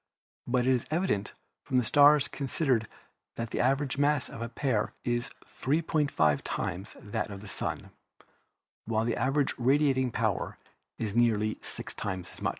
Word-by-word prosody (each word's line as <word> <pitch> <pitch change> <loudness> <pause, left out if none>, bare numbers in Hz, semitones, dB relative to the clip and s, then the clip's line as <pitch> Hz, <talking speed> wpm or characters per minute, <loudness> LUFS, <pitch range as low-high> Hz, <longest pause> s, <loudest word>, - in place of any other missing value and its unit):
But 125 0 +2
it 130 - +4
is 125 - -1
evident 155 - 0 0.3
from 130 - 0
the 125 - +3
stars 145 +2 +6
considered 135 -5 0 0.5
that 115 0 -4
the - - -2
average 135 +2 +1
mass 145 -1 +2
of 115 - -8
a 115 - -3
pair 120 -3 -1
is 120 +1 -1 0.3
3.5 145 - +2
times 95 +5 -4
that 105 0 -3
of 100 -1 -7
the 105 - -10
Sun, - - -4 0.9
while 110 0 0
the 115 - 0
average 135 +4 +1
radiating 130 0 +3
power 110 -4 -1 0.4
is 105 -2 -3
nearly 110 -3 +2
six - - -6
times 95 -3 -4
as - - -11
much. - - +1
120 Hz, 155 wpm, -29 LUFS, 110-140 Hz, 0.9 s, stars